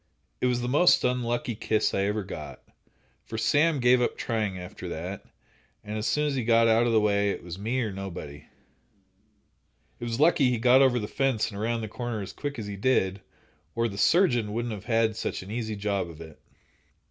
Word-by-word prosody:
"It 125 - +3
was 125 -1 0
the 120 - -2
most 150 +8 +4
unlucky 120 -1 -1
kiss 110 0 0
I 100 - +1
ever 105 +1 -1
got, - - -8 0.6
for 110 - -7
Sam 145 +7 +2
gave 125 0 +4
up 120 - 0
trying 105 -5 -2
after 90 0 -8
that, 90 +5 -5 0.6
and 105 +1 -6
as 110 +1 -2
soon 150 0 +1
as 145 - 0
he 130 -3 -1
got 115 0 +4
out 115 +1 +4
of - - +1
the 110 - +4
way, 100 -1 +2
it - - -4
was 85 +1 -8
me 120 +5 -1
or 110 -3 -2
nobody." 90 -7 -8 1.5
It - - -8
was 115 +1 -3
lucky 150 -4 +4
he 125 - 0
got 125 +3 +5
over 130 -2 +4
the 105 -3 -2
fence 130 -4 0
and 100 - -7
around 115 +2 -1
the 110 - -4
corner 120 +1 -4
as 95 - -8
quick 145 -2 -5
as 110 - -5
he 100 -1 -6
did, 100 -4 +1 0.5
or 115 0 +1
the 100 - -7
surgeon 120 - +3
wouldn't 120 0 -2
have 105 -1 -8
had 115 -2 +1
such 110 - -4
an 95 - -10
easy 110 -2 -3
job 100 -3 -2
of 80 -2 -12
it. 80 -2 -11
115 Hz, 210 wpm, -27 LUFS, 100-125 Hz, 1.5 s, got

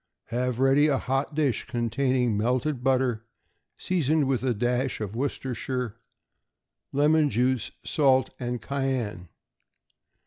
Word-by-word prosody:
Have 125 +1 -1
ready 135 +3 +4
a 140 -3 +2
hot 135 +4 -2
dish 145 -7 0
containing 120 0 0
melted 125 +5 0
butter 125 -4 +1 0.5
seasoned 155 -5 +1
with 130 -2 +1
a 130 -1 +1
dash 125 +3 0
of 105 -1 -5
Worcestershire, 125 -2 -3 1.0
lemon 150 +2 +3
juice, 125 +2 +1 0.2
salt 135 -3 +3
and 125 -1 -3
cayenne. 120 - -3
130 Hz, 110 wpm, -26 LUFS, 120-140 Hz, 1.0 s, ready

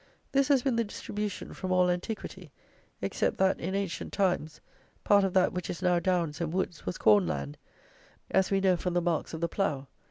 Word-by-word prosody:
This 275 -1 +3
has 275 -4 +3
been 260 -4 +1
the 230 - +3
distribution 210 -1 -5
from 185 -1 -4
all 180 0 +4
antiquity, 180 +5 -4 0.5
except - - 0
that, 190 0 +2
in 190 +3 -3
ancient 195 -4 -3
times, 175 -6 0 0.4
part 205 -1 +5
of 190 -2 0
that 185 -1 +4
which 180 -1 -4
is 175 - -5
now 180 -1 +3
downs 170 -3 0
and 165 -2 -1
woods 180 - -3
was 90 - -2
corn 105 -4 +5
land, 70 -1 -3 0.8
as 190 0 +3
we 195 -1 +2
know 190 -1 +4
from 180 +1 -2
the - - +4
marks 170 -1 -1
of 160 - -7
the 170 - +1
plough. 150 -7 -1
180 Hz, 200 wpm, -29 LUFS, 165-195 Hz, 0.8 s, part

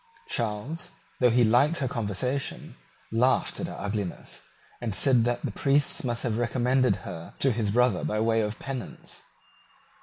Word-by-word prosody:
Charles, 115 +8 -2 0.3
though 125 - +5
he 120 +1 +4
liked 125 +9 +4
her 135 - 0
conversation, 125 +4 -2 0.4
laughed 125 +4 +2
at - - -2
her - - -7
ugliness, 100 -3 -4 0.4
and 110 -5 -2
said 125 -2 +4
that 120 0 -1
the - - -2
priests 140 0 +2
must 120 -2 -1
have 115 -2 -1
recommended 125 +2 +2
her 80 0 -8
to 135 - +2
his 110 -3 -1
brother 120 -2 +2
by 105 - -1
way 115 0 +2
of 105 0 -2
penance. 130 -3 -6
120 Hz, 155 wpm, -27 LUFS, 110-130 Hz, 0.4 s, though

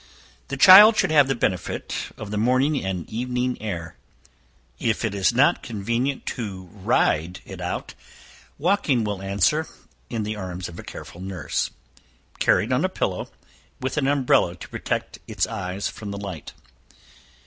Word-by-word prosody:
The 140 - -4
child 205 +8 +10
should 190 - +2
have 145 -3 +6
the 135 - 0
benefit 90 -6 -2
of 105 -1 -7
the 105 - -2
morning 130 +5 +2
and 95 -4 -3
evening 125 +1 -2
air. 85 -6 -5 0.8
If 115 0 0
it 110 - -2
is 100 +1 +2
not 130 +4 +3
convenient 120 +5 -2
to 100 -6 -5
ride 90 -3 +1
it - - -9
out, - - -4 0.6
walking 150 - +2
will 105 -2 -3
answer, 100 +11 +1 0.4
in 110 -2 -2
the 105 +1 -3
arms 95 -3 -5
of 85 - -10
a - - -8
careful 85 - -10
nurse, 95 -2 -2 0.7
carried - - +3
on - - +2
a - - +2
pillow, - - -2 0.5
with 130 - -3
an 140 -2 +1
umbrella 130 -10 +3
to - - -11
protect - - -3
its - - 0
eyes 100 -3 -4
from 105 - -7
the 100 - -5
light. 95 -8 -7
110 Hz, 155 wpm, -24 LUFS, 95-130 Hz, 0.8 s, child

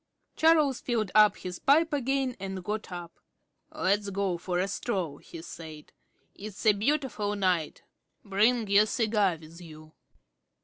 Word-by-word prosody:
Charles 310 -5 +3
filled 220 -6 -1 0.2
his 180 -1 -7
pipe 315 +3 +3
again 270 -2 0
and 190 -1 -5
got 210 +1 -4
up. 175 -1 -8 0.5
"Let's 200 +2 0
go 195 -3 -2
for 175 0 -3
a 185 +2 0
stroll," 190 -8 -3
he 165 -1 -11
said. 155 -3 -10 0.4
"It's 205 +1 -9
a 215 - +6
beautiful 220 -2 -1
night. 180 -6 -1 0.4
Bring 215 +3 +2
your 200 +2 +5
cigar 210 -7 +1
with 165 +2 -14
you." 155 -2 -13
200 Hz, 135 wpm, -28 LUFS, 180-235 Hz, 0.5 s, a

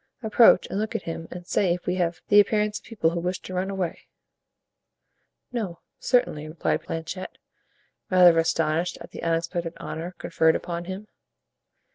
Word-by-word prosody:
Approach 220 -2 +6
and 195 - -1
look 215 +1 -3
at - - -2
him 165 0 -5
and 175 0 -8
say 180 -1 +2
if 180 - -11
we 180 - 0
have 175 -1 -1
the 205 - +7
appearance 210 0 +2
of - - -25
people 195 -8 0
who 170 - -2
wish 180 +2 -2
to 185 - -8
run 185 +1 -1
away." 190 -4 -4 1.4
"No, 210 -9 -3 0.2
certainly," 155 - +1
replied 155 +2 -1
Planchet, 165 +3 -6 0.7
rather 180 -3 +7
astonished 165 +1 0
at - - -11
the - - -8
unexpected 165 +1 -1
honor 175 +3 -6
conferred 160 -1 +2
upon 170 -1 -4
him. 190 +3 -6
175 Hz, 160 wpm, -25 LUFS, 165-195 Hz, 1.4 s, the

